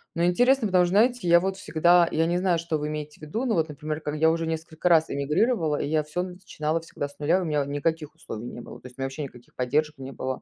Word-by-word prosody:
Но 170 - 0
интересно, 245 +6 +3
потому 185 -2 +4
что, 175 - -2
знаете, 225 0 +3
я 170 0 +7
вот 190 +1 -2
всегда 170 +1 +4
я 160 +1 +2
не 175 +1 +1
знаю, 180 -2 +2
что 165 -1 -2
вы 150 0 -3
имеете 150 0 -6
в - - -17
виду, 220 - -3
но 230 - +1
вот, 160 -3 +1
например, 150 +1 -4
когда 150 0 -3
я 160 +1 +4
уже 165 0 -1
несколько 160 +1 -3
раз 160 -2 +5
эмигрировала, 155 - +1
я 155 +1 0
всё 165 +4 -3
начинала 180 -4 -3
всегда 145 -3 -6
с - - -20
0. 165 +6 +2
У 180 - -3
меня, 150 -2 +1
у - - -6
никаких 150 +2 -2
условий 115 -7 -8
не 120 - -8
было. - - -11
То 125 - -10
есть 125 - -17
меня 135 - -2
вообще 135 +3 -5
никаких 125 -3 -11
поддержек 150 +5 0
не 135 0 -8
было, 130 -1 -4
160 Hz, 265 wpm, -26 LUFS, 150-175 Hz, -, я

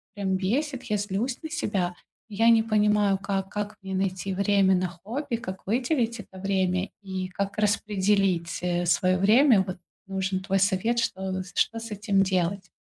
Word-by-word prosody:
прям 190 -2 0
бесит. 260 +7 -1
Я 210 -4 0
злюсь 205 +5 -2
на 315 - -5
себя. 195 - -1 0.3
Я 225 +3 +3
не 225 -1 +5
понимаю, 210 -2 +2
как, 195 -1 -2
как 210 +1 -4
мне 190 0 -5
найти 190 0 -1
время 195 0 +3
на 180 0 0
хобби, 230 - -4
как 190 -4 -7
выделить 240 +1 0
это 190 - -15
время 190 0 0
и 190 -1 -4
как 200 +2 -4
распределить, 195 -4 +1
э, 175 0 0
своё 185 +2 +2
время. 220 +3 +5
Вот 185 - -4 0.3
нужен 190 -1 -1
твой 195 0 0
совет, 205 +5 +1
что, 190 -3 -2
что 230 - +1
с 230 -1 -8
этим 200 -1 +1
делать. 185 0 -1
195 Hz, 165 wpm, -26 LUFS, 185-215 Hz, 0.3 s, не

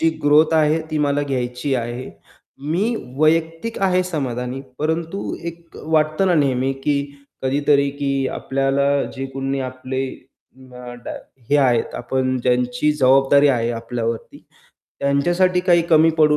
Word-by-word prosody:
जी 165 - +4
growth 150 +2 +4
आहे, 155 0 +3
ती 155 - -1
मला 145 -1 +1
घ्यायची 130 0 -2
आहे. 120 +1 -4 0.6
मी 205 +9 +1 0.2
वैयक्तिक 165 +7 +1
आहे 185 -1 +3
समाधानी, 130 -6 -3 0.2
परंतु 160 +5 -2
एक 170 0 -9
अ, - - -9
वाटतं 155 +4 +2
ना 180 - +3
नेहमी, 135 -3 +1
की 140 +1 -1 0.4
कधीतरी, 140 +1 +2
की 140 -1 -1
आपल्याला 135 +1 0 0.3
जे 135 0 -3
कोणी 135 0 -2
आपले 130 +1 -4 0.6
न 125 -1 -11
डा - - -5 0.4
हे 145 - +5
आहेत 125 -5 +2
आपण 130 +1 -1
ज्यांची 125 +3 +1
जबाबदारी 135 +1 +4
आहे 120 -3 +1
आपल्यावरती, 115 0 -4 0.6
त्यांच्यासाठी 175 +6 +2
काही 175 -2 +3
कमी 160 +1 +6
पडू 150 -1 +5
140 Hz, 135 wpm, -20 LUFS, 130-155 Hz, 0.6 s, कमी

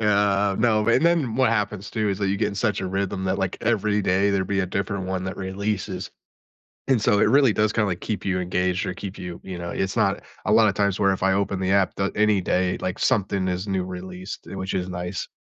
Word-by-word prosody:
Yeah, 100 -2 +2
no, 110 -2 +2
and 125 +7 +4
then 160 -10 +2
what 130 -3 +3
happens 105 -2 -1
too 110 -2 0
is 100 0 -1
that 100 -1 0
you 100 +1 0
get - - +1
in 100 - -6
such 105 +1 0
a 95 - -2
rhythm 95 0 -2
that, 95 +1 0
like, 95 -1 -2
every 105 -2 +1
day 95 +1 +2
there'd 95 -1 0
be 100 -1 0
a 95 - -1
different 100 0 -2
one 95 -1 -2
that 95 - -4
releases. 95 +1 -3 0.8
And 125 -5 +3
so 105 -1 +3
it - - +4
really 135 -4 +5
does 105 0 +2
kinda, 105 -3 +1
like, 90 -2 -3
keep 105 -3 -4
you 95 -2 0
engaged 90 +1 0
or - - -2
keep 100 +1 -7
you 90 -1 -7
you 95 -2 -6
know, 85 0 -5
it's 95 +3 -2
not 100 -4 +1 0.2
a 105 - +1
lot 110 0 +6
of 100 - +2
times 100 0 +1
where 100 -1 +3
if 95 - -4
I 95 - +4
open 95 -1 0
the 95 - 0
app 100 -2 +2
da 95 0 0
any 105 -2 +3
day, 90 0 0
like, 95 - -3
something 100 -6 +1
is 90 +2 -2
new 95 -1 0
released, 90 +1 -7
which 95 -1 -4
is 90 -1 -2
nice. 90 +1 -4
100 Hz, 250 wpm, -24 LUFS, 95-105 Hz, 0.8 s, lot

